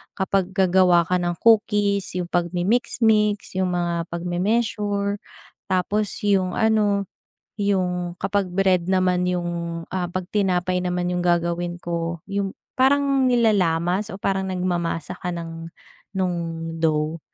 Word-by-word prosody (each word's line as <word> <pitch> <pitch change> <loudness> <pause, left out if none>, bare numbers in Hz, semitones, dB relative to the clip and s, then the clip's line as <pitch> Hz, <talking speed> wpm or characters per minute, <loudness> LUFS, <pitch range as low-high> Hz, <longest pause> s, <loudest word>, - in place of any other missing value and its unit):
Kapag 190 -1 0
gagawa 185 -2 +4
ka 180 +2 +1
ng 175 0 -1
cookies, 205 -4 +3
yung 175 -1 -3
pag-mimix-mix, 210 +3 +1
yung 185 -1 0
mga 170 -1 -1
pag 170 0 -5
me-measure, 205 +2 0 0.5
tapos 200 +3 0
yung 190 -3 +2
ano, 210 -2 +2 0.6
yung 180 -3 0
kapag 195 -1 0
bread 185 -2 +2
naman 185 -1 +2
yung, 170 -1 -3
ah, 180 -1 0
pag 185 0 -4
tinapay 185 -2 +1
naman 180 0 -1
yung 180 - -1
gagawin 175 0 0
ko. 170 -1 -3
Yung 200 -1 -2 0.3
parang 275 0 +3
nilalamas 200 -4 +2
o 190 - -7
parang 190 -1 -1
nagmamasa 175 -3 -2
ka 180 - -3
ng, 165 -1 -7 0.5
nung 185 -2 0 0.5
dough. 155 0 0
185 Hz, 125 wpm, -23 LUFS, 175-200 Hz, 0.6 s, gagawa